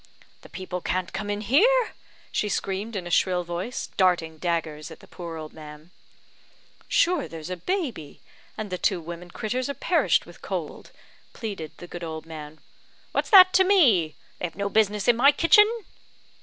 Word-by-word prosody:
"The - - -15
people 185 -1 -6
can't 185 +1 -2
come 205 +2 -4
in 205 0 -2
here!" 440 - +3 0.4
she 210 - -1
screamed 200 +3 -3
in 185 -3 -3
a 175 - -6
shrill 180 0 +2
voice, 175 +8 -5
darting 170 -4 +2
daggers 160 -3 -2
at 160 - -12
the - - -15
poor 170 -3 -8
old 155 -1 -8
man. 155 +1 -12 1.0
"Sure 345 -4 +2
there's 165 +1 -8
a - - -2
baby, 240 - -4 0.4
and 215 -3 -5
the 180 - -3
two 190 -4 +1
women 170 +2 -8
critters 245 +7 -3
are 280 - -3
perished - - +2
with - - -15
cold," - - -5 0.4
pleaded 195 -9 -6
the - - -9
good 175 0 -8
old 160 -1 -6
man. 155 -1 -9 0.5
"What's - - -1
that 370 -3 +9
to 380 - +6
me? 250 - +4 0.2
They - - -2
have 165 - -15
no 200 +1 -2
business 210 -1 +1
in 240 - +6
my 275 +4 +7
kitchen." 420 +8 +5
185 Hz, 175 wpm, -25 LUFS, 165-240 Hz, 1.0 s, that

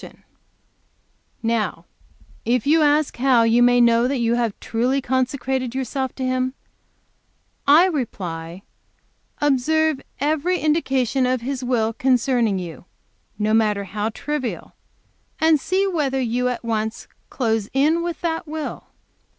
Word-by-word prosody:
And - - -13 1.2
now 230 -1 -1 0.6
if 240 -1 0
you 315 +3 +4
ask 300 0 +2
how 250 -2 +4
you 230 +1 +3
may 245 0 +5
know 235 0 +4
that 275 +1 -1
you 235 -1 +1
have 235 -3 -1
truly 250 +4 0
consecrated 260 -1 -1
yourself 265 0 -3
to 260 - -3
Him, 255 +1 -1 1.1
I 305 +5 +7
reply, 185 - -4 0.8
observe 295 +2 +2 0.2
every 310 +6 +1
indication 270 -5 +1
of 255 -1 0
His 260 +1 -4
will 230 -3 0
concerning 245 -4 +1
you, 175 -2 -7 0.5
no 215 +1 0
matter 210 -2 +2
how 210 +2 -3
trivial, 275 +2 -4 0.7
and 320 -1 +4
see 375 +7 0
whether 295 -8 0
you 250 0 0
at 245 -1 -5
once 220 0 -2 0.2
close 225 -5 -1
in 305 +5 +2
with 340 -2 -4
that 325 -2 -2
will. 310 0 -6
255 Hz, 130 wpm, -22 LUFS, 230-290 Hz, 1.2 s, I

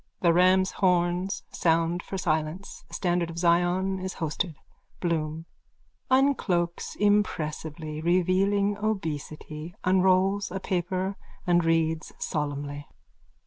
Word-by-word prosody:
(The 170 -3 +4
rams' 185 +2 +4
horns 180 +1 +1
sound 165 +1 +1
for 195 - -6
silence. 160 +2 -2
The - - -9
standard 175 -2 0
of 165 - -8
Zion 175 +2 +2
is 185 0 -4
hoisted.) 160 +1 -2 0.4
BLOOM: 160 -2 -2 0.6
_(Uncloaks 230 -11 +1
impressively, 160 -6 0
revealing 190 +4 +2
obesity, 160 -5 -4
unrolls 190 +2 +3
a 190 +2 -4
paper 185 +1 -2 0.3
and 175 -1 +3
reads 160 -1 +1
solemnly.) 145 -1 -3
175 Hz, 105 wpm, -27 LUFS, 160-190 Hz, 0.6 s, The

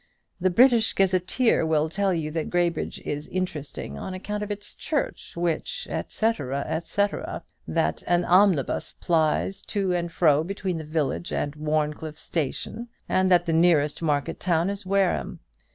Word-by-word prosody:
The 185 +1 +2
'British 235 +3 +5
Gazetteer' 190 +5 +2
will 160 -1 +2
tell 195 +4 0
you 160 -3 -1
that 160 0 -2
Graybridge 175 -1 0
is 145 +1 -3
interesting 150 - -4
on 185 - -5
account 210 +3 -4
of 210 - -4
its 205 0 -5
church, 295 - -3
which, 175 - -2 0.2
&c. 225 +1 +1
&c. 160 - -1 0.6
that - - 0
an 175 0 +2
omnibus 180 -6 +3
plies 170 +4 +1
to 195 -3 0
and 175 -1 -1
fro 155 -4 +4
between 185 -1 -3
the - - -5
village 155 0 -2
and 145 - -1
Warncliffe 150 0 -2
station; 170 - -3 0.2
and 185 0 +2
that 175 -1 +5
the 165 - 0
nearest 160 -3 +3
market 145 -3 0
town 175 +1 +1
is 200 -1 -7
Wareham. 195 -1 +1
175 Hz, 150 wpm, -25 LUFS, 155-195 Hz, 0.6 s, British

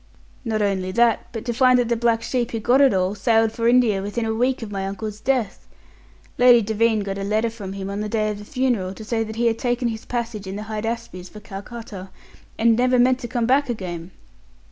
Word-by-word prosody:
"Not 220 -3 -1
only 190 -2 -1
that, 235 0 +2
but 225 -2 -6
to 240 - -1
find 255 +1 +5
that 245 -1 +1
the 235 - +1
black 230 0 +1
sheep 245 -2 -1
who 225 - -3
got 245 +5 +3
it 275 -2 +6
all 185 0 +1
sailed 225 +1 +2
for 230 +1 -1
India 235 -5 +4
within 205 +4 -3
a 220 - -1
week 250 +2 0
of 210 - -7
my 195 -1 -3
uncle's 210 +1 -5
death! 245 -3 -1 0.7
Lady 245 -1 +7
Devine 220 +1 +1
got 195 0 -4
a - - -3
letter 215 +3 0
from 200 -4 -7
him 195 -1 -5
on 200 +1 -4
the 210 - -3
day 215 -1 0
of 205 - -6
the - - -9
funeral 225 -7 -1
to 220 - -9
say 225 0 0
that 220 0 -7
he 235 +1 0
had 230 -1 +1
taken 245 -1 0
his 220 -1 -6
passage 230 -4 -4
in 190 - -5
the 210 - -5
Hydaspes 215 -4 -5
for 210 - -11
Calcutta, 205 -1 -9 0.5
and 230 0 +4
never 250 +2 +2
meant 250 +1 +4
to 240 - -6
come 235 0 -1
back 270 +3 +2
again!" 180 -6 -5
225 Hz, 230 wpm, -22 LUFS, 205-240 Hz, 0.7 s, Lady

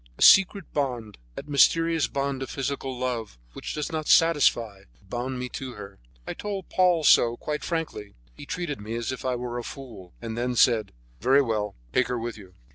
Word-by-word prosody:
A - - +1
secret 195 +1 +6
bond, 120 - -3 0.2
that 145 - -8
mysterious 165 +3 +3
bond 140 -1 -2
of 135 - -4
physical 135 -1 -3
love, 120 - -3 0.2
which - - -6
does 150 +3 -3
not 155 -1 -3
satisfy, 120 -11 +3 0.2
bound 125 +6 -4
me 125 0 -3
to 130 -1 -6
her. 100 -2 -11 0.3
I - - -4
told 200 -3 -5
Paul 180 -3 +3
so, 120 -4 +5
quite 150 0 -4
frankly. 155 - -4 0.2
He 140 - -12
treated 165 - -4
me 110 +2 -5
as 120 +1 -2
if 130 - -6
I 130 -1 0
were 120 0 -4
a - - -6
fool, 115 -10 -10
and 115 -1 -5
then 125 +1 -1
said: 115 -4 +3 0.3
"Very 135 +6 +4
well, 105 -4 -2 0.2
take 130 - +3
her 125 0 -2
with 115 0 -4
you." 95 -4 -14
125 Hz, 195 wpm, -26 LUFS, 115-145 Hz, 0.3 s, secret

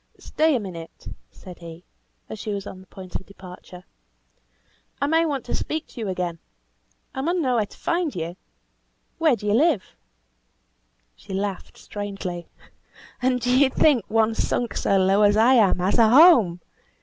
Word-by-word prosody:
"Stay 315 -1 +1
a - - +1
minute," 170 -5 -9 0.2
said 180 -2 -13
he, 170 0 -11 0.4
as 220 - -8
she 215 - -5
was 200 -1 -4
on 190 - -9
the 190 - -18
point 185 -1 -12
of - - -13
departure. 180 -2 -13 1.2
"I - - 0
may 325 +3 +2
want 275 -5 -3
to - - -5
speak 315 0 -3
to - - -12
you 215 - -3
again. 180 -3 -3 0.7
I 265 - -4
mun 345 +5 0
know 255 -6 +1
where 210 -2 0
to - - -17
find 335 -3 -2
you 170 0 -4 0.8
where 315 -5 +3
do 215 - -10
you 205 - +1
live?" 275 - +1 1.2
She 190 - -8
laughed 195 -1 -4
strangely. 195 -4 -6 0.7
"And 250 0 +1
do 250 +1 +1
you 270 0 +5
think 265 -4 +3
one 225 0 +2
sunk 235 +1 -2
so 195 - +1
low 190 +2 +3
as 205 0 +4
I 235 +4 +5
am 220 -7 +4
has 185 +6 0
a 225 -2 +6
home? 240 - +6
210 Hz, 175 wpm, -23 LUFS, 185-260 Hz, 1.2 s, a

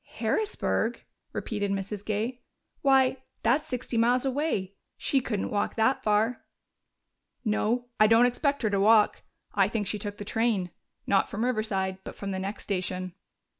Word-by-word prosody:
"Harrisburg?" 230 - 0 0.3
repeated 205 -2 -2
Mrs. 195 +1 -3
Gay. 220 +4 -2 0.4
"Why, 270 -1 +4 0.3
that's 265 +7 +2
sixty 245 -2 -2
miles 245 +3 +3
away! 265 -9 -1 0.2
She 270 - +1
couldn't 210 -5 -2
walk 205 - 0
that 235 +4 +2
far." 215 +3 +1 1.0
"No, 225 +3 +1
I 215 - +7
don't 225 +2 +6
expect 280 +3 0
her 215 - +1
to 200 - +1
walk. 215 +1 +5 0.3
I 195 -2 +4
think 210 -1 -2
she 210 +2 -2
took 205 0 -5
the 205 - -7
train 220 -5 0 0.3
not 195 - +2
from 220 +4 -2
Riverside, 195 -6 -1
but - - -8
from 200 -1 -5
the 190 - -2
next 195 +2 -4
station." 185 -2 -3
215 Hz, 155 wpm, -28 LUFS, 200-245 Hz, 1.0 s, I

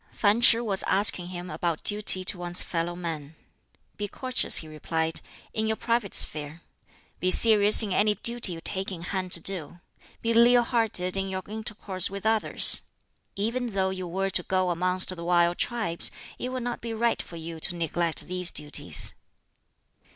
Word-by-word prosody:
Fan 210 +2 +1
Ch'i 230 -1 +6
was 195 -3 -1
asking 190 -3 +1
him 180 0 -7
about 170 -3 -3
duty 205 -3 +3
to 185 0 -3
one's 175 0 0
fellow 170 0 -4
men. 160 -4 -7 0.6
"Be 205 - -3
courteous," 255 +4 +1
he 160 - -1
replied, 160 +1 -4 0.3
"in 220 0 -2
your 220 - 0
private 230 -3 -2
sphere; 150 +2 -1 0.6
be 185 - 0
serious 210 +1 +7
in 200 -3 -3
any 210 +2 +2
duty 235 -5 +1
you 165 - -9
take 190 +3 -2
in 170 -3 -8
hand 185 0 -4
to - - +9
do; 175 -2 -3 0.4
be 230 0 0
leal 240 +1 +5
hearted 225 -7 0
in 195 0 0
your 190 0 -5
intercourse 210 -3 -4
with 200 +1 -8
others. 220 0 +2 0.5
Even 235 +5 -2
though 190 -1 0
you 185 -1 -6
were 195 +3 -3
to 180 - 0
go 185 0 -1
amongst 185 +2 -1
the 170 - -9
wild 175 0 +1
tribes, 220 -9 -1 0.3
it 250 - -4
would 255 -1 -5
not 245 0 -5
be 230 -1 -6
right 235 +1 0
for 170 - -12
you 165 0 -8
to 175 - -3
neglect 170 0 -3
these 180 -1 -3
duties." 150 -1 +2
185 Hz, 175 wpm, -25 LUFS, 175-220 Hz, 0.6 s, to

